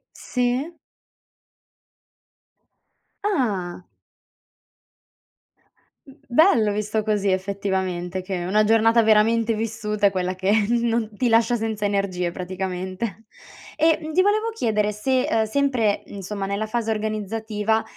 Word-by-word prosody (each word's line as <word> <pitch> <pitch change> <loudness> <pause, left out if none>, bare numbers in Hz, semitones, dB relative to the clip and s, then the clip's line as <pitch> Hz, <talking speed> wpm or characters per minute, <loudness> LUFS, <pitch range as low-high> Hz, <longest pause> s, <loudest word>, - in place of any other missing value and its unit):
Sì. 250 +6 -2 2.5
Ah. 205 - -1 2.2
M 270 - -14
bello 240 - +4
visto 210 +1 -1
così 205 -2 0
effettivamente, 190 -2 -2
che 185 -2 -4
una 210 +4 +3
giornata 225 +1 +4
veramente 220 +1 +3
vissuta 215 -1 -3
è - - +4
quella 185 -1 -2
che 190 +2 0 0.2
non 235 -2 +1
ti 245 +1 +1
lascia 230 +1 +4
senza 220 -2 -3
energie 190 -3 -1
praticamente. 185 +3 -5 0.5
E, 320 0 +3
mhmm, 310 0 -5
ti 370 - +3
volevo 430 +3 +1
chiedere 210 - 0
se, 255 +5 0
uhm, 220 -1 +2
sempre 240 -3 +1
insomma 200 0 -6
nella 200 +2 -2
fase 225 0 -2
organizzativa, 215 0 -1
215 Hz, 110 wpm, -23 LUFS, 195-230 Hz, 2.5 s, bello